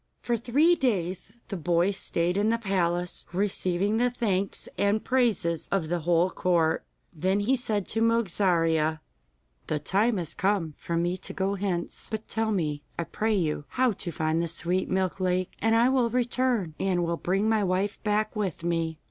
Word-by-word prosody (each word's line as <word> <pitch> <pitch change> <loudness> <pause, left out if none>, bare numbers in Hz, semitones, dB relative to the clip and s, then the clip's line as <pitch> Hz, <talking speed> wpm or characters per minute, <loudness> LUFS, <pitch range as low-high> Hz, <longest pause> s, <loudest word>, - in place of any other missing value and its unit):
For 240 - +1
three 270 +9 +3
days 190 - -1 0.2
the 200 - -3
boy 175 +2 +2
stayed 175 -2 -1
in 205 +2 +2
the 230 - +2
palace, 180 -5 -1
receiving 195 +1 0
the 245 +1 +3
thanks 200 -6 -1
and 205 +2 +1
praises 225 -10 +1
of 180 -5 0
the 175 0 0
whole 170 +2 +2
court. 170 -3 +1 0.3
Then 190 +5 +1
he 250 +6 +2
said 215 -6 -1
to 225 - 0
Mogarzea: 170 -8 +2 0.7
'The 150 - -1
time 210 +8 +2
has 170 -4 -3
come 190 -5 0
for 170 - -3
me 175 +2 0
to 185 - -4
go 195 +1 0
hence, 185 -3 -2
but 220 -1 -5
tell 220 0 -1
me, 150 -7 -1 0.2
I 170 - 0
pray 215 +6 -1
you, 155 -5 -1
how 255 -1 +2
to 180 -3 -5
find 160 +1 0
the 170 - -1
Sweet 175 +3 -1
Milk 190 0 0
Lake, 185 0 0
and 225 +1 +3
I 235 +2 +5
will 255 -3 +2
return, 245 -6 0
and 180 -2 +1
will 170 0 0
bring 195 +5 0
my 220 -2 +2
wife 190 +2 -1
back 215 0 0
with 195 -6 -2
me. 165 -2 -1
190 Hz, 180 wpm, -27 LUFS, 170-220 Hz, 0.7 s, I